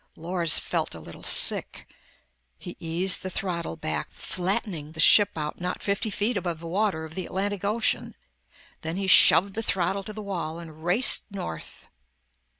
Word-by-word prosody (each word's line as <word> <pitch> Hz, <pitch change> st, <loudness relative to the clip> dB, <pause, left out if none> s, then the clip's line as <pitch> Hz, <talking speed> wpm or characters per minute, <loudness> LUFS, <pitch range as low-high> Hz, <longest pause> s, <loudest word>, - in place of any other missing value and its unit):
Lors 170 Hz, -1 st, +2 dB
felt -, -, -2 dB
a -, -, -8 dB
little -, -, -12 dB
sick. -, -, +1 dB, 0.7 s
He -, -, -9 dB
eased 170 Hz, +3 st, 0 dB
the 185 Hz, -, -4 dB
throttle 175 Hz, -3 st, -3 dB
back, 80 Hz, -, -3 dB
flattening 180 Hz, -4 st, -2 dB
the 160 Hz, -, -11 dB
ship 205 Hz, +4 st, +7 dB
out 150 Hz, +2 st, -4 dB
not 180 Hz, 0 st, -4 dB
fifty 200 Hz, +2 st, 0 dB
feet 210 Hz, +3 st, 0 dB
above 175 Hz, -4 st, -3 dB
the 170 Hz, -, -10 dB
water 185 Hz, -1 st, 0 dB
of 160 Hz, 0 st, -9 dB
the 185 Hz, 0 st, -5 dB
Atlantic 200 Hz, +1 st, -3 dB
Ocean. 215 Hz, +3 st, 0 dB, 0.7 s
Then 160 Hz, +2 st, -4 dB
he 195 Hz, -, -2 dB
shoved 190 Hz, +1 st, +7 dB
the 225 Hz, -, -3 dB
throttle 195 Hz, -2 st, 0 dB
to 215 Hz, -, -6 dB
the 215 Hz, -, -8 dB
wall 170 Hz, -5 st, -4 dB
and 160 Hz, -2 st, -11 dB
raced 190 Hz, +9 st, +2 dB
north. 135 Hz, -, -7 dB
180 Hz, 165 wpm, -26 LUFS, 165-200 Hz, 0.7 s, ship